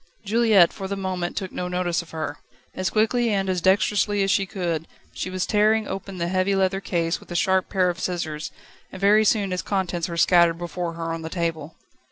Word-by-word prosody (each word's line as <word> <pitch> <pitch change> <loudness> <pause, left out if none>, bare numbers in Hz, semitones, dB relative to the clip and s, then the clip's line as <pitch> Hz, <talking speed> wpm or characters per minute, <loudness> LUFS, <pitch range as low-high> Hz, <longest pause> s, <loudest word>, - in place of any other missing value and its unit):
Juliette, 215 -4 +4
for 195 - -6
the 200 - -3
moment, 185 -2 -3
took 190 -3 -3
no 180 - -4
notice 180 -1 -1
of 170 - -15
her. 155 -2 -5 0.3
As 185 -1 -1
quickly 230 +4 +2
and 195 -2 0
as 185 -2 0
dexterously 200 +2 +2
as 195 - +1
she 195 -3 +1
could, 170 -4 -3 0.3
she - - -4
was 185 0 -2
tearing 215 +1 +2
open 195 0 -6
the 170 -1 -1
heavy 185 +2 +1
leather 190 0 +1
case 170 -3 -1
with - - -18
a 175 - -6
sharp 190 +1 +2
pair 185 -2 +2
of 175 0 -2
scissors, 165 -3 -3 0.4
and 190 - -9
very 205 +2 +5
soon 205 -3 +1
its 180 - -1
contents 180 -3 -2
were 170 - -5
scattered 170 -1 +4
before 175 0 -4
her 165 0 -4
on 165 - -5
the 160 - -6
table. 165 -3 -3
185 Hz, 215 wpm, -24 LUFS, 170-195 Hz, 0.4 s, very